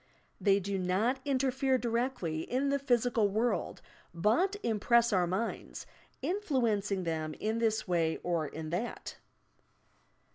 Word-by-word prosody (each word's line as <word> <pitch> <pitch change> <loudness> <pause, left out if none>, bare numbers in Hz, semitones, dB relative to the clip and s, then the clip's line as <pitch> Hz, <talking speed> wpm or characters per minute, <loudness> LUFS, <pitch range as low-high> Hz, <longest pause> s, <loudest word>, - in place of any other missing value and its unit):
They 200 -1 +4
do 195 0 -2
not 200 +9 +1
interfere 265 -1 +1
directly 235 -9 -1
in 260 +9 -1
the 280 0 +1
physical 245 -5 +2
world, 225 +4 -1 0.3
but 235 - +2
im 220 -2 0
press 235 +1 +4
our 180 -2 +3
minds, 195 +6 -3 0.4
influencing 230 - 0
them 155 -2 -2
in 220 +2 -2
this 220 -2 0
way 165 -3 +1
or 170 -3 0
in 155 +2 -6
that. 205 +8 -4
220 Hz, 130 wpm, -31 LUFS, 180-250 Hz, 0.4 s, They